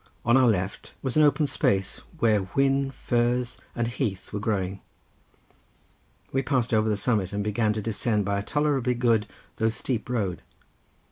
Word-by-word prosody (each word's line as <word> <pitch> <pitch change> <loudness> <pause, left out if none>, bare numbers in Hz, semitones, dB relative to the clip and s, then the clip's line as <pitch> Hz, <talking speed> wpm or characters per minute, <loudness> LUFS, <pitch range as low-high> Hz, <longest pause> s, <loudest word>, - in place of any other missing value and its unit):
On 120 +2 +5
our 130 -1 +5
left 95 -3 -1
was 130 -2 -2
an 155 - +5
open 150 0 +4
space 95 -8 0 0.2
where 110 -7 +3
whin, 135 +7 +1
furze 120 -1 0 0.2
and 120 -1 0
heath 115 -6 -3
were 105 - -2
growing. 100 -3 -1 1.5
We 135 - +1
passed 125 -3 0
over 110 0 +3
the 105 - +1
summit, 105 -4 0
and 100 0 -2
began 105 +1 +1
to 105 -1 -4
descend 105 -1 0
by 100 0 0
a - - -4
tolerably 135 -2 +1
good, 115 -3 +2 0.3
though 110 0 +2
steep 115 +1 -3
road. 100 -8 -1
115 Hz, 160 wpm, -26 LUFS, 105-125 Hz, 1.5 s, On